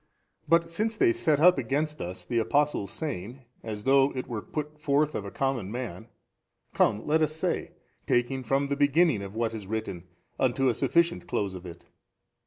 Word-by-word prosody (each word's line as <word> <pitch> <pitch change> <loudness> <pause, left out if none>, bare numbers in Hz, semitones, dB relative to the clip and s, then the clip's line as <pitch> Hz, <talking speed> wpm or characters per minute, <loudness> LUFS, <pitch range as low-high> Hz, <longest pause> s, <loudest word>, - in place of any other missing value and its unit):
A. - - -33
But 165 0 +3
since 215 +6 -1
they 370 -1 +5
set 155 - +2
up 180 0 +6
against 150 +5 -1
us 90 +1 -6
the 120 - 0
Apostle's 145 -3 +1
saying, 125 - -5 0.2
as 105 -2 -6
though 135 +1 +4
it 130 - -3
were 115 -4 -4
put 150 0 -6
forth 150 0 +1
of 100 - -4
a - - -5
common 125 -5 -2
man, 115 -4 -5 0.7
come 105 - +2
let 160 +2 +2
us 155 0 +1
say, 160 - -2 0.3
taking 130 +2 +1
from 135 +4 +1
the 140 - +1
beginning 145 - +3
of 100 +1 -8
what 115 0 -1
is 105 -4 -7
written 105 -5 -4 0.3
unto 130 +1 +2
a - - +2
sufficient 170 +8 +1
close 100 -2 -1
of 90 -1 -8
it. 85 0 -11
135 Hz, 190 wpm, -28 LUFS, 110-150 Hz, 0.7 s, up